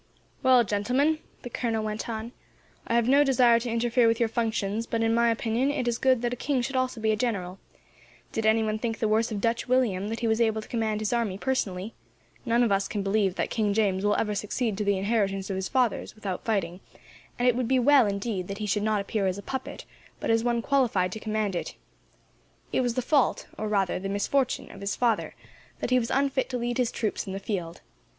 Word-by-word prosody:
"Well, 255 -2 +5
gentlemen," 250 +10 +1 0.2
the 245 - -6
colonel 225 -2 -1
went 215 +2 -4
on, 225 +1 -4 0.6
"I 230 - 0
have 235 -1 +3
no 280 +3 +6
desire 245 -4 +4
to 240 +1 -4
interfere 235 +1 +2
with 230 0 +2
your 230 -2 +2
functions, 225 -1 -1
but, 225 -1 -1
in 225 0 +2
my 235 0 +3
opinion, 230 +3 0
it 280 -4 -1
is 235 -1 0
good 260 -2 +3
that 240 0 0
a - - -2
king 265 0 -1
should 270 +2 -4
also 255 -2 0
be 220 0 +1
a - - +2
general. 195 -5 -2 0.7
Did 225 -1 -1
anyone 220 -1 +2
think 225 0 -2
any - - -22
the 220 - +2
worse 220 +2 +1
of 210 - -2
Dutch 230 +3 0
William, 230 -7 +1
that 225 +2 -4
he 235 - +1
was 220 +1 +1
able 220 -1 +2
to 215 - -9
command 220 -2 -1
his 215 +2 -1
army, 225 -5 0
personally? 205 -5 -2 0.5
None 235 +1 +3
of 230 - +1
us 195 0 +1
can 205 -2 -3
believe 195 -2 +1
that - - -2
King 210 -3 0
James 200 -3 +1
will 205 0 +2
ever 210 -1 0
succeed 210 +2 -2
to - - +1
the 200 -1 +1
inheritance 195 -1 0
of - - -2
his 190 0 -3
fathers, 250 -6 0
without 200 -4 -5
fighting; 190 -5 -1 0.6
and 245 - +1
it 245 - +4
would 250 -1 -1
be 260 +1 +3
well, 260 -1 +5
indeed, 200 -2 -2
that 200 - -5
he 215 - -3
should 210 0 0
not 215 -1 +1
appear 200 0 -1
as 185 0 -1
a 200 - -8
puppet, 265 +3 -6 0.3
but - - -1
as 225 0 +2
one 235 -1 0
qualified 230 -10 +2
to 220 - -5
command. 215 -3 -2 1.2
It - - +2
was 245 -2 -1
the 255 - 0
fault, 285 0 +2
or 215 - -4
rather 195 -4 0
the 195 +1 -4
misfortune, 250 +6 0
of 195 - -12
his 200 0 -2
father, 235 -3 0 0.4
that - - -4
he 255 - +5
was 230 - -3
unfit 275 -1 +1
to 250 - -2
lead 240 +1 -2
his 245 -2 +1
troops 215 -2 -2
in 190 - -4
the 195 - -4
field. 180 -5 -4
225 Hz, 230 wpm, -27 LUFS, 205-245 Hz, 1.2 s, no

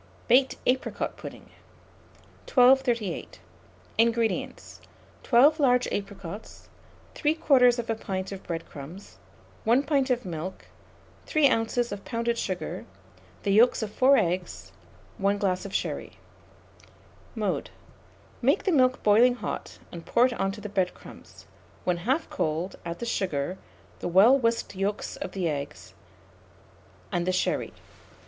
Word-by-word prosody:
BAKED 260 +2 +4
APRICOT 255 +1 -1
PUDDING. - - -10 1.0
1238. 245 - +3 0.6
INGREDIENTS. 230 -1 0 0.4
12 280 +6 +5
large 250 -3 +3
apricots, 200 0 -7 0.4
3/4 250 -7 +2
pint 190 -1 -4
of 195 -1 -7
bread 165 -1 -5
crumbs, 155 +8 -11 0.5
1 240 +5 +3
pint 280 -2 +1
of 245 -3 0
milk, 175 +1 -6 0.6
3 295 -3 +4
oz. 230 +1 0
of 200 -1 -6
pounded 235 0 -2
sugar, 185 -2 -4 0.6
the 200 - +1
yolks 225 +3 +4
of 210 -1 -5
4 270 +2 +5
eggs, 175 - -2 0.5
1 200 +1 +2
glass 190 -1 -1
of 200 - -6
sherry. - - -3 1.2
Mode. - - -2 0.7
Make - - +2
the 385 - +1
milk 255 -4 +3
boiling 235 +4 +5
hot, - - -6
and 170 -1 -8
pour 240 +7 +3
it 255 - 0
on 195 -4 -1
to 210 - -9
the 210 - -5
bread 190 -3 -1
crumbs; - - -14 0.4
when 180 -1 0
half 265 - 0
cold, 160 +4 -2
add 170 0 -5
the 235 - -5
sugar, 185 -6 -2 0.4
the - - -3
well 195 +9 +6
whisked 230 -5 0
yolks 195 +2 -2
of - - -6
the 185 -3 -1
eggs, 145 -1 -5 1.2
and 175 0 -1
the - - +3
sherry. 185 - -1
215 Hz, 130 wpm, -27 LUFS, 185-250 Hz, 1.2 s, well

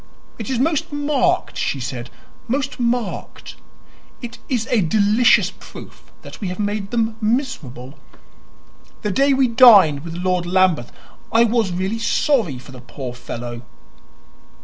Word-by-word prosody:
"It 225 - -5
is 260 - -1
most 300 +4 0
marked," 290 -2 0
she 140 - -2
said 120 -1 -6 0.4
"most 270 +2 -2
marked. 240 -2 -3 0.6
It 240 -1 -9
is 240 -4 0
a 235 -4 +3
delicious 210 +6 +3
proof - - -14
that - - -11
we 200 - -3
have 180 0 -5
made 205 -1 -3
them 225 -1 -1
miserable. 185 - -3 1.0
The 210 - -1
day 275 +7 +3
we 265 -1 +3
dined 210 - +6
with 165 -1 -7
Lord 180 0 -1
Lambeth 180 -8 +2 0.4
I 230 +1 +5
was 225 -4 +1
really 190 +5 -2
sorry 230 - +1
for 130 +2 -13
the 130 -2 -11
poor 125 0 -7
fellow." 120 -1 -7
210 Hz, 140 wpm, -20 LUFS, 165-245 Hz, 1.0 s, dined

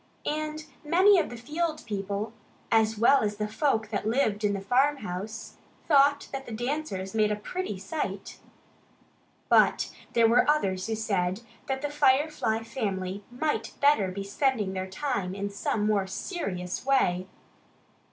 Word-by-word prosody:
And 310 +1 -3 0.2
many 370 +5 +5
of - - -1
the 240 - -8
field 310 +6 -3
people, 205 +1 -3 0.4
as 220 -1 +3
well 255 +6 +5
as 210 -1 -1
the 210 0 -1
folk 220 -1 0
that 205 -2 -2
lived 220 -3 +1
in 205 -1 +2
the 200 - -2
farmhouse, 220 -3 -1 0.3
thought 285 -2 +4
that 270 0 -6
the - - -7
dancers 230 -5 -3
made 215 -1 +2
a - - +1
pretty 210 - -4
sight. 195 -1 -5 1.1
But - - +4 0.2
there 230 -1 +5
were 240 +5 +4
others 195 -11 +1
who 225 - -1
said 195 -3 -1 0.3
that 265 +1 -2
the 290 - -2
Firefly 280 -5 +2
family 200 -5 -3
might 295 +5 -2
better 285 -9 +4
be 190 +2 -4
spending 210 -1 0
their 190 0 -4
time 195 -5 -2
in 200 0 -3
some 210 +1 -1
more 205 -2 +1
serious 185 - -4
way. 185 -9 +2
220 Hz, 150 wpm, -28 LUFS, 200-280 Hz, 1.1 s, many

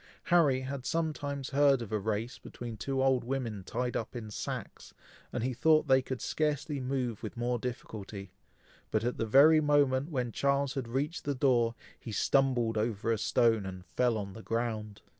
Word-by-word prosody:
Harry 150 -7 +3
had 135 0 -5
sometimes 145 -4 -2
heard 140 -1 +4
of 115 -3 -7
a 110 - 0
race 110 +4 -3
between 120 -2 -8
two 135 +4 -1
old 130 -2 +3
women 120 -6 -3
tied 125 +5 -3
up 115 - -3
in 110 -3 -6
sacks, - - -6 0.4
and 120 - -3
he 130 +1 0
thought 155 +5 +3
they 130 -1 +5
could 130 -1 -5
scarcely 150 -1 -1
move 125 -4 -2
with - - -7
more 120 0 0
difficulty; 105 -5 -6 0.6
but 110 0 0
at 120 +1 -1
the 115 - 0
very 150 +7 +7
moment 145 -1 +2
when 125 -6 -2
Charles 140 +2 +1
had 135 -5 -3
reached 140 +8 -2
the 145 -1 -1
door, 120 -3 +2 0.2
he 115 - -8
stumbled 120 -1 +2
over 110 +1 -1
a 115 - +2
stone, 115 -1 +3
and 95 -1 -7
fell 120 0 +1
on 100 -2 -5
the 110 - -9
ground. 110 -3 -3
125 Hz, 180 wpm, -31 LUFS, 115-140 Hz, 0.6 s, very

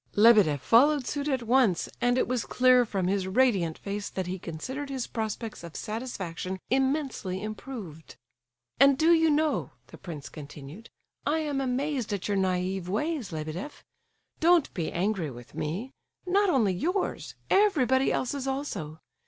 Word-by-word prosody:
Lebedeff 205 -9 +6
followed 275 +3 +5
suit 285 +2 -3
at 265 -4 0
once, 235 -6 +3
and 245 +1 +3
it - - +2
was 250 -2 -1
clear 250 -1 +5
from 195 -4 -1
his 190 0 0
radiant 190 -7 +2
face 200 0 -4
that 190 - -3
he 185 +1 -4
considered 260 - -6
his 265 -3 -3
prospects 220 -2 -4
of 170 -2 -9
satisfaction 190 -5 -5
immensely 265 -8 0
improved. 215 - -8 0.6
"And 275 0 +6
do 325 +3 +5
you 325 -1 +4
know," 305 +1 +1
the - - -14
prince 155 -6 -7
continued, 150 +7 -10 0.4
"I 300 +2 +2
am 290 -3 -1
amazed 265 -2 -1
at 200 - -3
your 205 -1 0
naive 185 -1 -1
ways, 260 - -2
Lebedeff! 160 - -6 0.6
Don't 335 -1 +4
be 165 -3 -3
angry 185 -3 -1
with 120 -2 -12
me—not 270 - -2
only 225 - +3
yours, 360 - -2 0.2
everybody 270 - +3
else's 270 +1 -2
also! 205 - -4
230 Hz, 145 wpm, -28 LUFS, 185-275 Hz, 0.6 s, Lebedeff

